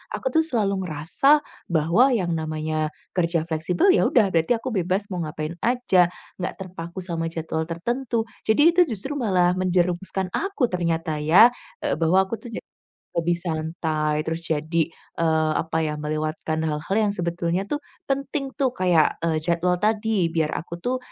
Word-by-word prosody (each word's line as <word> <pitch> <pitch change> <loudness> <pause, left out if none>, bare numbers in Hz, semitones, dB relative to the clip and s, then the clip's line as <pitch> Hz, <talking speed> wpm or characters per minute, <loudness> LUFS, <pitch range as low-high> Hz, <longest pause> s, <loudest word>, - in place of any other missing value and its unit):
aku - - -3
tuh 320 - +5
selalu 210 -11 0
ngerasa 220 - +2 0.3
bahwa 170 - +4
yang 180 -6 -1
namanya 155 -1 -2 0.3
kerja 170 -2 +1
fleksibel 170 - +2
ya - - +3
udah 210 -6 +3
berarti 165 +8 +3
aku 255 +3 -5
bebas 195 0 -1
mau 180 - -3
ngapain 155 0 -4
aja, 235 -8 +3 0.3
nggak 180 - -2
terpaku 180 -2 -8
sama 165 -2 -2
jadwal 160 0 -3
tertentu. 235 +7 -2 0.2
Jadi 295 +10 +5
itu 360 - +5 0.2
justru 270 +9 -3
malah 185 -10 +2
menjerumuskan 185 +1 0
aku 390 -9 0
ternyata 165 -3 -1
ya, 185 +11 +7 0.3
eee, - - +1
bahwa 185 +4 +4
aku 230 - -3
tuh 230 - -10
ja 230 - -6 0.5
lebih 170 +1 +1
santai, 155 -2 -1
terus 165 +1 -2
jadi, 160 +1 0 0.3
eee, 160 -1 +2
apa 160 0 -1
ya, 150 - -1
melewatkan 155 +1 -2
hal-hal 155 +5 -2
yang 210 -2 +2
sebetulnya 170 0 -1
tuh 290 +9 -3 0.3
penting 275 0 -2
tuh 260 -3 +1
kayak, 175 -4 +3
eee, 160 -2 +1
jadwal 175 +2 +1
tadi, 215 -2 +1
biar 160 -2 +1
aku 170 +1 -5
tuh, 255 +1 0
175 Hz, 160 wpm, -24 LUFS, 160-215 Hz, 0.5 s, ya